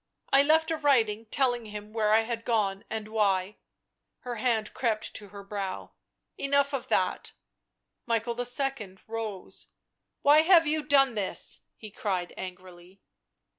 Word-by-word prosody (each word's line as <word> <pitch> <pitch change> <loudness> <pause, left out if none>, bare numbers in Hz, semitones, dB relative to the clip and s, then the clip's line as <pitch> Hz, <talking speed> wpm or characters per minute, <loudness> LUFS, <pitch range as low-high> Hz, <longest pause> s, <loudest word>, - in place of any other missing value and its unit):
I 275 - +8
left 315 +3 +3
a 320 - 0
writing 230 -7 +2
telling 245 -2 +1
him 210 0 -8
where 215 -2 +1
I 220 +1 +6
had 230 0 -4
gone 205 -5 0
and 220 -1 -4
why 200 -2 +1 0.3
" - - -56
Her 245 -1 -4
hand 220 -2 0
crept 225 -4 -1
to 205 - -7
her 200 0 -10
brow. 195 -2 -5 0.2
" - - -55
Enough 280 0 +1
of 270 - -3
that." - - 0 0.7
Michael 230 0 0
II. 245 -5 -2
rose. 220 -4 -6 0.3
" - - -55
Why 295 +2 +7
have 330 +1 +6
you 310 +1 0
done 275 -3 +4
this?" 205 -3 -2 0.2
he 215 -2 -10
cried 185 -4 -3
angrily. 185 0 -10
225 Hz, 155 wpm, -28 LUFS, 205-270 Hz, 0.7 s, I